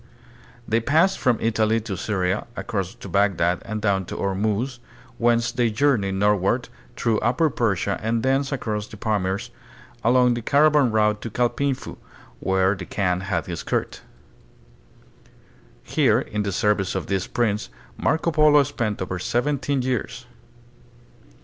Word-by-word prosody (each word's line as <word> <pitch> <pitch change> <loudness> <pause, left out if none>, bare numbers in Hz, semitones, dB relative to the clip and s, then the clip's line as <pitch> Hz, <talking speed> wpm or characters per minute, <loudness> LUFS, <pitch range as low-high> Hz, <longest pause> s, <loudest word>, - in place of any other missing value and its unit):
They 115 +1 +2
passed 160 +10 +2
from 125 -4 +2
Italy 110 0 +1
to 105 -3 -5
Syria, 95 +1 -1
across 95 -7 -3
to - - -10
Bagdad, 90 -2 +1
and 110 0 -5
down 100 -3 +1
to - - -7
Ormuz, 105 +6 -1 0.4
whence 115 0 +2
they 120 -2 +1
journeyed 110 -5 +1
northward 105 +4 +1 0.3
through 115 -3 +1
upper 135 +6 +1
Persia 100 -5 0
and 115 +2 -1
thence 135 +1 +1
across 105 -6 -3
the 110 - -11
Pamirs 105 +1 -2 0.5
along 125 +1 +4
the 120 - -3
caravan 145 0 +4
route 105 -1 +2
to 115 - -5
Kaipingfu, 125 +4 -1 0.4
where 95 0 +2
the 95 -3 -7
Kaan 90 -3 0
had 90 -5 -2
his 85 -2 -5
court. - - -3 1.8
Here - - +2
in 105 - -3
the 100 -1 -2
service 100 -1 0
of 95 - -2
this 95 -1 -2
prince 105 - -1 0.3
Marco 160 - 0
Polo 150 -2 +5
spent 120 -8 -3
over 90 0 -4
seventeen 135 +4 0
years. 125 -3 -3
110 Hz, 140 wpm, -23 LUFS, 100-125 Hz, 1.8 s, Polo